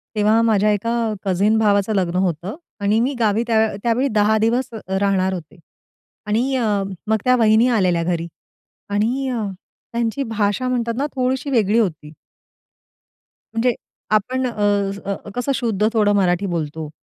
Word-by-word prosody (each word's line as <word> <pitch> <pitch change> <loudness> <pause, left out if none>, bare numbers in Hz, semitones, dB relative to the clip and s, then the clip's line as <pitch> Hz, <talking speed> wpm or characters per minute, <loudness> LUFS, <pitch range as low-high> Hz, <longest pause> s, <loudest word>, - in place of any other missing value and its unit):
तेव्हा 215 +2 +3
माझ्या 215 -2 +3
एका 230 +2 0
कझीन 200 +4 +2
भावाचं 205 -1 +2
लग्न 180 -2 0
होतं. 180 - -3 0.3
आणि 210 +2 +2
मी 260 +4 +1
गावी 220 0 +2
त्या 220 -2 +2
त्यावेळी 240 +3 +1
10 215 +1 +4
दिवस 235 +4 +1
अ, 220 - -7 0.2
राहणार 190 -1 +1
होते. 175 +1 -8 0.7
आणि 245 +6 +1
अ, 240 -3 0 0.4
मग 220 0 +3
त्या 255 0 +4
वहिनी 225 0 +4
आलेल्या 175 -3 +2
घरी 170 -1 -2 0.6
आणि 235 +7 0
अ, 235 -4 -2 0.5
त्यांची 235 +4 -1
भाषा 220 0 -1
म्हणतात 235 -2 -1
ना, 280 - 0
थोडीशी 260 +2 -1
वेगळी 225 -3 +2
होती. 155 -8 -2 1.4
म्हणजे 235 +2 +2 0.4
आपण 255 +5 -2
अ, 230 -4 -5 0.4
अ, 200 0 -1 0.2
कसं 245 +3 -1
शुद्ध 215 -4 0
थोडं 210 -2 +3
मराठी 185 0 +2
बोलतो. 160 -3 -3
220 Hz, 150 wpm, -20 LUFS, 195-235 Hz, 1.4 s, 10